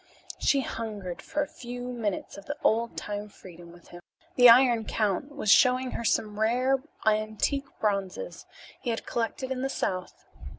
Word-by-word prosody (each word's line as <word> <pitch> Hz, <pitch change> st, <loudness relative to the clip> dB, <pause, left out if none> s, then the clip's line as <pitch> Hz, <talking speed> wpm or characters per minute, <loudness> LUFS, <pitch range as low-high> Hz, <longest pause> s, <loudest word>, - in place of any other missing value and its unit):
She 280 Hz, -2 st, +3 dB
hungered 210 Hz, -7 st, -5 dB
for 295 Hz, -, -2 dB
a -, -, -6 dB
few 245 Hz, -1 st, -8 dB
minutes 215 Hz, -5 st, -3 dB
of 200 Hz, -, -11 dB
the 290 Hz, -, -4 dB
old 230 Hz, +1 st, +1 dB
time 205 Hz, 0 st, -5 dB
freedom 175 Hz, -3 st, -13 dB
with 175 Hz, 0 st, -17 dB
him. 175 Hz, 0 st, -11 dB, 0.3 s
The 245 Hz, -1 st, +9 dB
Iron 240 Hz, -1 st, +6 dB
Count 215 Hz, +6 st, -1 dB
was 215 Hz, -8 st, +1 dB
showing 255 Hz, +2 st, +5 dB
her -, -, -4 dB
some 210 Hz, -2 st, 0 dB
rare 255 Hz, +4 st, +2 dB, 0.2 s
antique 215 Hz, +6 st, +1 dB
bronzes 205 Hz, -, -2 dB, 0.3 s
he 245 Hz, -, -3 dB
had 225 Hz, -, -2 dB
collected 245 Hz, +3 st, -3 dB
in 255 Hz, -1 st, -2 dB
the 270 Hz, -, -1 dB
south. 185 Hz, -8 st, -3 dB
225 Hz, 165 wpm, -28 LUFS, 205-255 Hz, 0.3 s, The